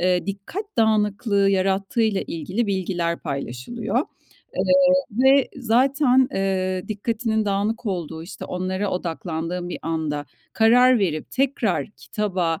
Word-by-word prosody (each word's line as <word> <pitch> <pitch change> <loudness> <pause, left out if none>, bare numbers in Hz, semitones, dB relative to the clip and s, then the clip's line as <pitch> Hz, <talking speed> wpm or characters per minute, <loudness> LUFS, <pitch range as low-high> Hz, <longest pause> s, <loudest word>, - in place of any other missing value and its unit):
eee, 180 +1 +1
dikkat 200 - -5
dağınıklığı 210 -2 +2
yarattığıyla 195 +2 +1
ilgili 185 +8 -2
bilgiler 175 -3 -1
paylaşılıyor. 150 - -3 0.6
Eee, - - +1 0.5
ve 265 +4 +4
zaten, 260 +2 +3
eee, 185 -1 -1
dikkatinin 220 +1 -1
dağınık 210 +3 -1
olduğu, 165 -4 -3
işte, 170 - -8
onlara 185 +2 -2
odaklandığın 175 0 -3
bir - - -5
anda 155 -3 -2 0.3
karar 245 +2 +5
verip 160 -6 -1
tekrar 250 -7 0
kitaba 185 -6 -2
195 Hz, 110 wpm, -23 LUFS, 180-225 Hz, 0.6 s, karar